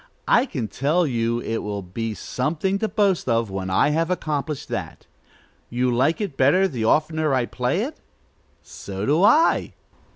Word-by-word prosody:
I 255 - +4
can 125 - -3
tell 150 - +1
you 115 -3 0
it 115 -1 -2
will 100 -1 -4
be 110 +5 -4
something 165 - -2
to 220 - 0
boast 200 - +1
of, 115 -3 +1
when 95 -1 -4
I 95 +10 +3
have 165 +2 0
accomplished 150 -5 -3
that. - - -5 0.6
You 125 +1 0
like 140 +7 +2
it 200 -10 -3
better 150 +9 +4
the 120 -10 -3
oftener 155 +2 +2
I 125 -2 +1
play - - -1
it? - - -7 0.6
So 100 0 -6
do 155 +6 +2
I." 300 +11 +4
140 Hz, 165 wpm, -23 LUFS, 115-170 Hz, 0.6 s, I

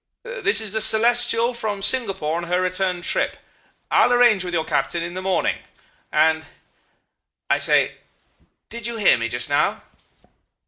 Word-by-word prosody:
This 485 0 +1
is 215 -3 -1
the 220 - -2
Celestial 235 +2 +3
from 210 -4 -5
Singapore 195 -11 +3
on 170 - -5
her 180 +1 -1
return 185 -1 -2
trip. - - -2 0.5
I'll - - +3
arrange 240 -6 +3
with 180 - -5
your 165 -2 -2
captain 170 -1 -2
in 175 +1 -6
the 185 - -6
morning... 190 0 -1 0.5
and,... 160 +1 +2 1.1
I - - +2
say... - - +1 0.7
did 235 -1 -5
you 235 -1 -5
hear 205 - +3
me 115 0 -3
just - - -2
now? - - -1
195 Hz, 150 wpm, -21 LUFS, 175-235 Hz, 1.1 s, Celestial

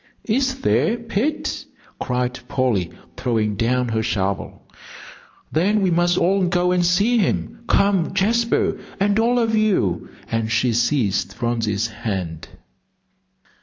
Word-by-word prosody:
"Is 260 +3 0
there, 230 -2 +2
Pet?" 235 +6 -2 0.4
cried 125 0 -2
Polly, 115 -10 0 0.3
throwing 110 -4 0
down 125 +3 0
her 110 -1 0
shovel, 100 -3 -2 0.9
"then 195 +6 +2
we 185 - +2
must 175 +1 +2
all 190 +1 +2
go 180 0 +1
and 180 -1 +2
see 200 +8 +3
him. 230 +3 -1
Come, 200 -4 +2
Jasper, 230 +4 +1 0.2
and 200 +2 +2
all 240 +2 +2
of 225 -2 +1
you," 195 - +1 0.2
and 115 0 -1
she 115 +1 +2
seized 110 -6 0
Phronsie's 115 -2 -1
hand. 100 -8 -4
160 Hz, 125 wpm, -21 LUFS, -, 0.9 s, see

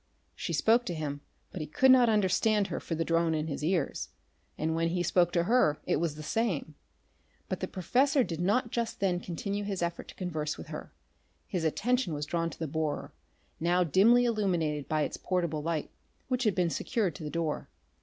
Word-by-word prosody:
She - - -4
spoke 230 +2 +3
to 175 - -2
him, 145 -2 -4 0.3
but 180 - -5
he 155 - -4
could 260 - +5
not 250 -2 +6
understand 210 0 +2
her - - -3
for 165 - -4
the 165 +1 -1
drone 165 -1 +2
in 155 0 -1
his 150 -2 -4
ears, 165 -2 0 0.5
and 160 +1 0
when 165 +1 +1
he 175 +1 0
spoke 175 0 +3
to 170 - +3
her 190 -7 +3
it - - +1
was 160 -1 -1
the 155 - -8
same. 180 -6 -1 0.7
But - - -3
the - - -2
professor 260 - +2
did 170 -6 -4
not 230 +6 +1
just 235 -1 -2
then 185 -3 +1
continue 200 +4 -3
his 195 -3 -2
effort 170 0 -3
to - - -11
converse 155 -5 -3
with - - -9
her. - - -7 0.5
His 180 -4 -3
attention 230 - +1
was 145 0 -3
drawn 165 +1 -1
to - - -11
the 165 - -3
borer, 155 0 -2 0.5
now 175 +2 +3
dimly 220 - +5
illuminated 175 - 0
by 155 -1 +2
its - - -3
portable 170 -5 -1
light, 160 0 -2 0.4
which 255 -1 0
had 210 - +2
been 175 -3 +1
secured 200 -3 -1
to 155 - -9
the 150 - -4
door. 165 -1 -2
175 Hz, 205 wpm, -30 LUFS, 160-210 Hz, 0.7 s, not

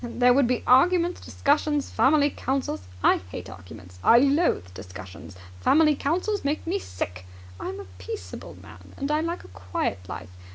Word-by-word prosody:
There 245 +1 +3
would 270 -1 +4
be 250 0 0
arguments, 345 +7 +4
discussions, 295 0 0
family 290 +1 +4
councils! 260 - -3 0.2
I - - +5
hate 90 +1 -7
arguments! 90 0 -12
I 235 - +7
loathe 275 - +2
discussions! 95 0 -10 0.2
Family 305 - +4
councils 365 +10 -1
make 285 +2 -1
me 370 +4 -1
sick! 90 - -6 0.3
I'm 95 +1 -5
a 100 - -8
peaceable 90 0 -7
man, 90 +1 -14
and 275 +2 -2
I 305 +1 +2
like 335 +2 -3
a - - -13
quiet 90 +1 -3
life! 90 - -7
250 Hz, 160 wpm, -25 LUFS, -, 0.3 s, I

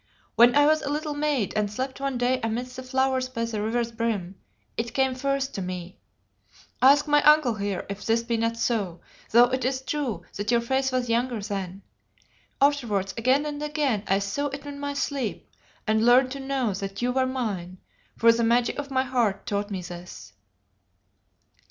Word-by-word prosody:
When 240 +3 +6
I 290 0 +6
was 310 +1 +3
a - - -3
little 300 +1 -2
maid 290 -7 0
and 210 -1 0
slept 260 +4 -4
one 275 -2 -1
day 250 +1 +1
amidst 240 +3 -3
the 260 - -6
flowers 260 0 0
by 230 -2 -2
the 220 -2 -3
river's 230 +2 -1
brim, 220 -6 -2 0.4
it 230 0 -4
came 265 -1 +2
first 275 +1 -1
to 195 - -4
me 180 -1 -6 0.8
ask 285 +3 +6
my 295 0 +4
uncle 300 -5 +5
here 200 -3 -3
if 200 +1 -6
this 230 +1 +2
be 235 0 -1
not 230 0 -1
so, 200 -8 -1 0.3
though 240 +2 +6
it 260 -1 -1
is 260 +1 -1
true 265 -4 -3
that 205 +1 -3
your 235 -1 +4
face 265 +3 0
was 255 -1 0
younger 235 0 0
then. 195 -2 -5 0.8
Afterwards 235 -10 +1
again 255 +5 +2
and 295 -1 -4
again 295 -7 0
I 195 - +3
saw 200 +9 -2
it 280 0 -7
in 285 -1 -7
my 285 0 -3
sleep 275 -5 -3 0.4
and 220 0 +2
learned 250 +2 +5
to 275 - -5
know 270 -5 -1
that 195 +2 -5
you 250 - +2
were 260 0 +1
mine, 200 -9 -3 0.4
for 230 0 +6
the 230 0 0
magic 235 +3 +2
of 285 -1 -5
my 260 -1 +1
heart 245 -6 0
taught 205 -3 -2
me 190 -3 -4
this. 175 - -10
245 Hz, 190 wpm, -26 LUFS, 215-270 Hz, 0.8 s, When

